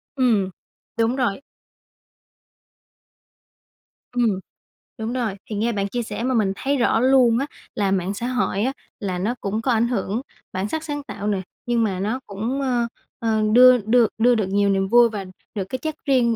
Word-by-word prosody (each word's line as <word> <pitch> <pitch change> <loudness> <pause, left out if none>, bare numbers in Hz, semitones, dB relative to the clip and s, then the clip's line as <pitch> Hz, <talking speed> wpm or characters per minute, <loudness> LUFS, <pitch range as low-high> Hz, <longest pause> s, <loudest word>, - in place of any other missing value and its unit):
Ừm, 225 -8 +2 0.5
đúng 230 +2 +2
rồi. 245 -4 0 2.7
Ừm, 230 -6 +1 0.6
đúng 225 +1 -3
rồI, 235 -6 -1
thì 215 - -3
nghe 225 +3 +1
bạn 200 -2 -1
chia 240 +3 -2
sẻ 230 - -5
mà 260 - +1
mình 205 -5 +2
thấy 280 +6 0
rõ 235 -2 +2
luôn 250 -2 +5
á, 275 - 0 0.3
là 200 -2 +1
mạng 190 0 0
xã 235 +4 -3
hội 250 -5 0
á 265 +3 0 0.3
là 185 -3 -2
nó 215 +7 -1
cũng 210 +3 -2
có 255 - +1
ảnh 230 +1 +3
hưởng 225 0 -1 0.3
bản 190 +3 -2
sắc 320 +5 -3
sáng 290 -2 -4
tạo 210 -7 -6
nè, 200 -2 0 0.2
nhưng 240 -1 +2
mà 190 -4 -1
nó 215 +6 -1
cũng 225 +7 -3
ơ, 245 -3 +1 0.3
ờ, 220 -1 +1
đưa 255 +1 +8
đưa 230 +2 +3
đưa 245 +2 +4
được 215 -4 0
nhiều 200 0 +2
niềm 195 -1 +1
vui 240 +2 +6
và 205 -3 -5 0.3
được 200 - -1
cái 260 - -2
chất 315 +2 -4
riêng 245 -4 +3
230 Hz, 185 wpm, -22 LUFS, 200-250 Hz, 2.7 s, đưa